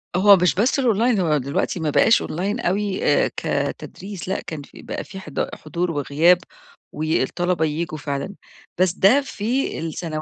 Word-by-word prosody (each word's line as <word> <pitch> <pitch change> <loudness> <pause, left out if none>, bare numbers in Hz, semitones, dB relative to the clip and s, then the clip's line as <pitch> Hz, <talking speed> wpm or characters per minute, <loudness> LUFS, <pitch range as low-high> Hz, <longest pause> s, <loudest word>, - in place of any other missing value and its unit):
هو 200 +2 +7
مش 180 -1 +2
بس 240 +9 +2
الأونلاين 235 -2 +2
هو 160 -4 +2
دلوقتي 140 +6 -2
ما 160 -2 -1
بقاش 225 +9 +4
أونلاين 195 +8 -3
أوي 200 -1 -1
آآ، - - +3
كتدريس 195 -2 -4
لأ 190 - -1
كان 155 -3 -7
في 140 - -14
بقى - - -5
في 190 - -10
حض 155 -7 -4
حضور 170 +3 -3
وغياب، 155 +4 +3 0.5
والطلبة 160 +2 0
ييجوا 155 +1 -3
فعلًا، 145 +6 -4 0.4
بس 185 -1 +3
ده 215 +10 +4
في 255 0 -2
السنو 160 -1 -4
180 Hz, 160 wpm, -22 LUFS, 155-200 Hz, 0.5 s, هو